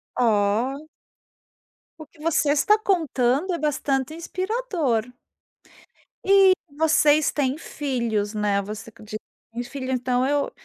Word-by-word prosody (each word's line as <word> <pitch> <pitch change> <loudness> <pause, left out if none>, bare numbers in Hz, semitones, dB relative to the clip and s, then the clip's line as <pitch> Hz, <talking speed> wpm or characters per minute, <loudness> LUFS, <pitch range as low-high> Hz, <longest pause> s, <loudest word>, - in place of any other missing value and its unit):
Ó. 235 +6 +1 1.1
O 310 - -9
que 300 +1 -21
você 305 -2 +2
está 305 +9 +4
contando 320 - +1
é - - -1
bastante 290 -2 -1
inspirador. 335 - -2 1.1
E 390 -1 +6 0.3
vocês 310 -1 +4
têm 275 -1 -1
filhos 235 -10 -2
,né, 205 -2 0
você 215 +3 -8
condi 215 -1 -8 0.4
tem 240 - -3
filho, 260 +1 -6
então 250 0 0
eu 285 0 0
275 Hz, 115 wpm, -24 LUFS, 235-315 Hz, 1.1 s, E